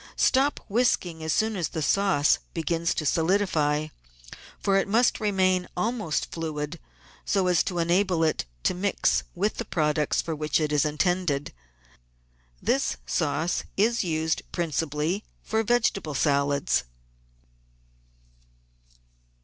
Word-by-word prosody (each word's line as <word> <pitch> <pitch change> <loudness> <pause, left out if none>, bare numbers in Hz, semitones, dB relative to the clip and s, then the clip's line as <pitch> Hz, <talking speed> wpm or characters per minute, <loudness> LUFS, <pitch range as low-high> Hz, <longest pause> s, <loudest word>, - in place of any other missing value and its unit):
Stop 275 +2 +3
whisking 190 -7 0
as 160 - -1
soon 220 +5 +1
as 175 -4 -1
the 160 - -4
sauce 190 -7 +3 0.2
begins 165 0 0
to 155 - -2
solidify, 160 -3 +1 0.7
for 195 - +1
it 195 - +2
must 230 +4 +3
remain 185 -3 +1
almost 215 -5 -1
fluid 155 0 -4 0.4
so 195 -2 +1
as 180 -2 +3
to 180 - -3
enable 175 0 +2
it 155 - 0 0.2
to - - +2
mix 190 +2 +1
with 200 +4 -1
the - - -2
products 150 -4 0
for 165 - -2
which 150 +1 0
it 155 -1 -1
is 150 0 +2
intended. 150 -1 0 1.1
This - - 0
sauce 165 - 0
is 230 +3 +2
used 160 -2 -1
principally 165 +2 -1 0.2
for 220 0 0
vegetable 220 -9 0
salads. 140 0 +1
170 Hz, 120 wpm, -26 LUFS, 155-200 Hz, 1.1 s, Stop